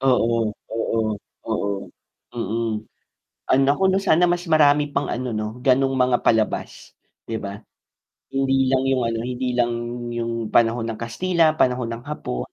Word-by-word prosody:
Oo, 120 -3 +2 0.3
oo, 115 0 -1 0.5
oo, 110 -2 -1 0.6
mm. 115 0 -2 0.8
Ah, - - +5
nako 140 +8 +3
‘no, 190 - +2
sana 180 -3 +3
mas 175 0 0
marami 145 -1 +4
pang 140 - 0
ano 125 +1 -2
'no, 110 0 -2 0.2
gano’ng 135 0 +3
mga 125 -1 +3
palabas, 110 -2 0 0.3
'di 115 - -3
ba. 100 0 -5 0.7
Hindi 135 -1 +2
lang 130 -1 +2
yung 135 -1 +2
ano, 115 0 -2
hindi 125 +1 -3
lang 120 -1 +2 0.4
yung 115 -1 -3
panahon 115 0 +3
ng 110 - -6
Kastila, 160 +7 +1
panahon 125 -4 +1
ng 115 0 -6
Hapon, 60 - -4
’di - - -21
125 Hz, 155 wpm, -22 LUFS, 115-140 Hz, 0.8 s, Ah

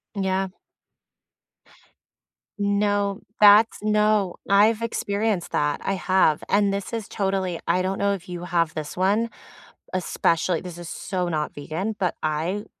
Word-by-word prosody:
Yeah. 190 -1 0 2.1
No. 205 0 0 0.2
That's 210 +2 +7
no, 210 -3 +2
I've 215 +3 +4
experienced 205 -4 -1
that, 150 0 0
I 195 - 0
have, 185 -5 +2
and 200 0 +2
this 200 +3 -4
is 225 -3 -4
totally 190 -3 -1
I 180 +2 +2
don't 190 +1 -1
know 200 0 +2
if 185 -2 -7
you 175 0 -6
have 170 -2 0
this 155 -1 -5
one, 205 +5 +1 0.6
especially- 170 -2 0
this 175 -2 -9
is 175 - -8
so 180 0 -3
not 155 -2 -2
vegan- 170 +9 -4
but 180 -3 0
I 165 +7 -2
195 Hz, 135 wpm, -24 LUFS, 175-205 Hz, 2.1 s, That's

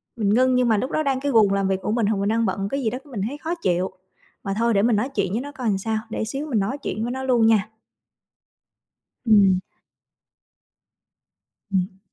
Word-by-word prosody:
mình 215 -4 0
ngưng 255 +2 +3
nhưng 250 -1 +3
mà 220 - +3
lúc 255 +6 -2
đó 310 - 0
đang 270 -2 0
cái 285 +1 -1
guồng 215 -5 +4
làm 195 -1 +1
việc 190 -1 0
của 210 - -2
mình 230 -1 +1
hoặc 215 -1 +1
mình 200 +1 0
đang 225 +1 +1
bận 195 0 -2
cái 275 +3 -2
gì 225 - +1
đó 250 - -4
cái 290 - -16
mình 215 -6 -4
thấy 285 +5 -6
khó 325 +3 -3
chịu. 185 - -1 0.5
Mà 195 - -2
thôi 230 +1 +2
để 200 - +3
mình 230 +1 +3
nói 225 +6 0
chuyện 200 -8 -1
với 225 +4 -1
nó 285 +2 -7
coi 255 -5 -3
sao, 220 +2 -1
để 225 - -3
xíu 275 +6 -4
mình 240 -8 0
nói 210 +8 -2
chuyện 225 -5 -4
với 240 - -2
nó 265 +1 -4
luôn 245 -4 +3
nha! 215 -2 +3 1.6
Ừm. 200 -5 +5 2.1
Ừm. 190 0 -1
225 Hz, 230 wpm, -23 LUFS, 200-255 Hz, 2.1 s, Ừm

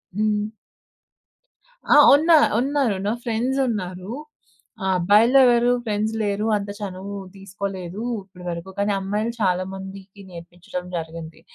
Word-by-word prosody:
హ్మ్. 210 0 0 1.5
ఆహ్. - - +8
ఉన్న 320 +4 +2 0.3
ఉన్నారు 270 -5 +1
నా 215 - +1
ఫ్రెండ్సున్నారు. 225 -6 -2 0.9
అబ్బాయిలో 215 +9 +5
ఎవరు 240 0 +4
ఫ్రెండ్స్ 215 +1 -1
లేరు 205 +1 -1
అంత 200 0 -6
చనువు 195 0 -6 0.2
తీసుకోలేదు. 195 0 -6 0.2
ఇప్పటి 185 -2 -15
వరకు 170 +3 -6
కానీ 205 +1 +1
అమ్మాయిలు 210 +4 -2
చాలా 185 -1 +2
మందికి 195 +1 -10
నేర్పించడం 175 +1 -8
జరిగింది. 160 0 -7
200 Hz, 110 wpm, -22 LUFS, 185-220 Hz, 1.5 s, ఆహ్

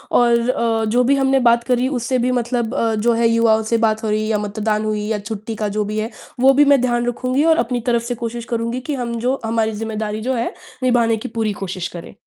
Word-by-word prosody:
और 235 0 +3
अ, 225 -3 +1
जो 245 +2 +3
भी 280 +3 +4
हमने 270 0 +2
बात 235 0 +3
करी, 250 0 +1
उससे 255 +2 -1
भी 250 +1 +1
मतलब 240 0 -2
अ, 225 -5 +1
जो 235 +3 +2
है, 230 0 +2
युवाओं 225 -1 +3
से 230 - +4
बात 220 0 -2
हो 220 - -1
रही 215 0 0
या 215 - +2
मतदान 215 +1 -2
हुई 210 -1 -2
या 215 -2 -1
छुट्टी 215 +1 -6
का - - +1
जो 210 - +2
भी 215 +1 -4
है, 220 +1 -2 0.3
वो 270 +2 +6
भी 290 +2 +5
मैं 280 -2 +5
ध्यान 240 -1 0
रखूँगी 255 +3 0
और - - -1
अपनी 245 +1 -2
तरफ 235 0 +1
से 245 0 -3
कोशिश 230 0 -4
करूँगी 230 +2 -1
कि 290 - 0
हम 235 0 -3
जो 255 +3 0
हमारी 225 0 0
ज़िम्मेदारी 215 -1 -3
जो 255 +4 -1
है, 235 -1 -2 0.3
निभाने 235 -3 +3
की 235 - -6
पूरी 215 -2 0
कोशिश 185 -1 -4
करें। 165 - -10
230 Hz, 245 wpm, -19 LUFS, 220-245 Hz, 0.3 s, वो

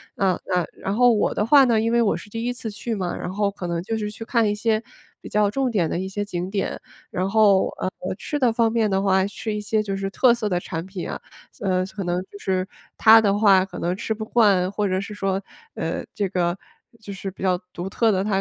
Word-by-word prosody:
啊， 190 -2 +1
呃， 180 -1 +2
然 195 +2 -2
后 245 0 +5
我 210 - +1
的 210 - 0
话 275 +2 +7
呢， 230 -3 +3
因 230 +1 0
为 235 0 +3
我 215 - +2
是 205 - -11
第 225 +2 -5
1 245 - 0
次 225 -3 -6
去 220 +2 -4
嘛， 185 -3 -2
然 - - -5
后 200 0 0
可 195 -3 -6
能 170 -1 -2
就 225 +2 -2
是 210 -1 -3
去 220 +2 -8
看 230 -3 +2
一 205 - 0
些 220 0 +1 0.4
比 - - -9
较 210 -1 +2
重 265 +1 0
点 185 -8 +1
的 170 - -2
一 190 - -3
些 205 +1 -3
景 180 -1 -4
点。 195 -1 -2 0.3
然 185 +2 -1
后， 205 -3 +4
呃， 185 - -1 0.3
吃 295 - -3
的 245 -3 +3
方 225 -1 +2
面 225 -2 +1
的 190 0 +1
话， 190 -1 +3
吃 215 +1 -5
一 210 - -3
些 215 +1 0
就 195 -2 -3
是 195 0 -3
特 240 +3 +4
色 220 -3 -2
的 175 -1 +1
产 165 -1 -5
品 190 -2 -6
啊。 - - -5 0.4
呃， 185 -1 +1
可 195 0 -6
能 175 +1 0
就 200 - -11
是， 185 0 -1 0.3
她 225 0 +8
的 200 -1 +2
话 195 -3 +5
可 - - -10
能 175 +2 -1
吃 220 - -2
不 220 0 -5
惯， 200 -6 +3
或 205 0 -1
者 185 0 0
是 210 +1 -7
说， 195 -1 -1 0.3
呃， 165 +1 -3
这 200 -2 -1
个， 175 -1 0 0.4
就 200 - -8
是 195 0 -6
比 185 - -15
较 180 -1 +2 0.2
独 180 +2 -5
特 225 +2 +2
的 190 0 +1
她 210 -1 -1
200 Hz, 270 characters per minute, -23 LUFS, 190-220 Hz, 0.4 s, 她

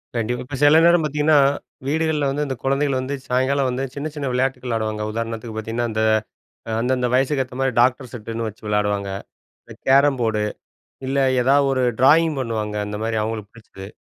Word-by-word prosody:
கண்டிப்பா. 120 +2 -1
இப்ப 135 +1 -6
சில 150 +2 +7
நேரம் 170 -1 +5
பார்த்தீங்கன்னா, 150 +1 +2 0.5
வீடுகள்ல 155 -1 0
வந்து 145 +2 -1
இந்த 130 - -3
குழந்தைகள் 135 0 +1
வந்து 135 +2 -3
சாயங்காலம் 130 +2 +1
வந்து 125 +2 -2
சின்ன, 145 +2 -3
சின்ன 140 -2 -3
விளையாட்டுகள் 130 0 -1
விளையாடுவாங்க. 110 -2 -2
உதாரணத்துக்கு 115 0 -5
பார்த்தீங்கன்னா, 115 +2 -2
அந்த 110 0 -1 0.8
அந்தந்த 125 +1 0
வயதுக்கு 135 +1 +2
ஏத்தமாரி 130 +1 -2
டாக்டர் 125 0 +1
செட்டுன்னு 115 0 -5
வச்சு 110 +1 -10
விளையாடுவாங்க. 105 -1 0 0.6
இந்த - - -12
கேரம் 135 +1 +5
போர்டு. 110 -2 0 0.6
இல்ல 135 +1 -1 0.2
ஏதாவது 140 +2 +3
ஒரு 130 -1 0 0.2
ட்ராயிங் 160 +4 +5
பண்ணுவாங்க. 110 -4 -3
அந்தமாரி 110 +2 -3
அவுங்களுக்கு 110 -2 -5
பிடிச்சது. 95 -3 -11
125 Hz, 160 wpm, -21 LUFS, 110-140 Hz, 0.8 s, சில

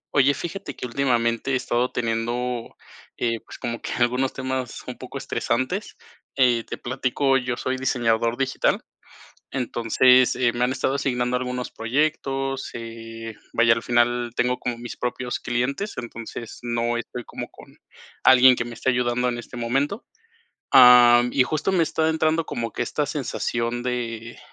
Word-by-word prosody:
Oye, 140 0 +4
fíjate 175 -2 -6
que - - -6
últimamente 120 -1 0
he - - +3
estado 125 0 0
teniendo, 120 +1 -2 0.4
eh, 115 -1 -1
pues, - - -11
como 115 -2 -4
que - - -4
algunos 125 +2 +1
temas 130 -1 -4
un - - -6
poco - - -7
estresantes, 130 - -2 0.4
eh, 125 -3 +3
te - - -6
platico, 130 +2 0
yo 125 -2 -2
soy 130 0 -2
diseñador 115 -3 +1
digital, 135 -1 0 0.7
entonces, 125 0 +3
eh, 125 -1 +2
me 120 +1 -1
han 125 - +2
estado 130 +1 -1
asignando 125 -2 0
algunos 125 0 -4
proyectos, 135 +1 -1
eh, 115 -1 -8 0.2
vaya, 115 0 +5
al 115 - -5
final 120 0 +1
tengo 125 +1 +1
como 120 -1 -4
mis 120 0 -7
propios 125 0 -3
clientes, 135 - -2
entonces, 115 -1 -7
no 120 0 -1
estoy 120 +1 -6
como - - -7
con - - -16 0.5
alguien 130 0 +7
que 120 - -2
me 120 - -7
esté 130 - -1
ayudando 125 0 +1
en 120 - -3
este 120 +1 -9
momento, 135 - -1 0.7
am, 125 -1 +8
y 130 - +4
justo 155 +7 -1
me 180 -3 +3
está 160 0 +1
entrando 160 +1 +1
como 115 -6 -4
que - - -1
esta 145 +5 -1
sensación 120 -4 -2
de 120 -2 -4
125 Hz, 155 wpm, -24 LUFS, 120-130 Hz, 0.7 s, am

